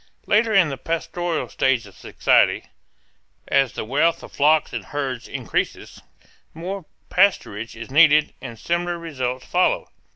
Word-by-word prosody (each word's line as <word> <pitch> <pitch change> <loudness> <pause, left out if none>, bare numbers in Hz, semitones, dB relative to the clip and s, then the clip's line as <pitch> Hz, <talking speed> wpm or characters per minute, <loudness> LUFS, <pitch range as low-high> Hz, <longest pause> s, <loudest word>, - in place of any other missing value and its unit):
Later 220 +2 +2
in 195 -6 +4
the 135 -2 -6
pastoral 165 +1 -3
stage 130 -4 0
of 100 - -14
society, - - +2 0.8
as 135 -3 +2
the - - -5
wealth 150 +8 +1
of - - -11
flocks 155 +2 +2
and - - -5
herds 135 -4 -4
increases, - - -4 0.5
more 185 +2 -6 0.3
pasturage 115 - +1
is 115 +3 -9
needed 150 0 +5
and 115 - -8
similar 175 +6 -2
results 130 -6 -4
follow. 180 +1 0
155 Hz, 135 wpm, -22 LUFS, 130-175 Hz, 0.8 s, needed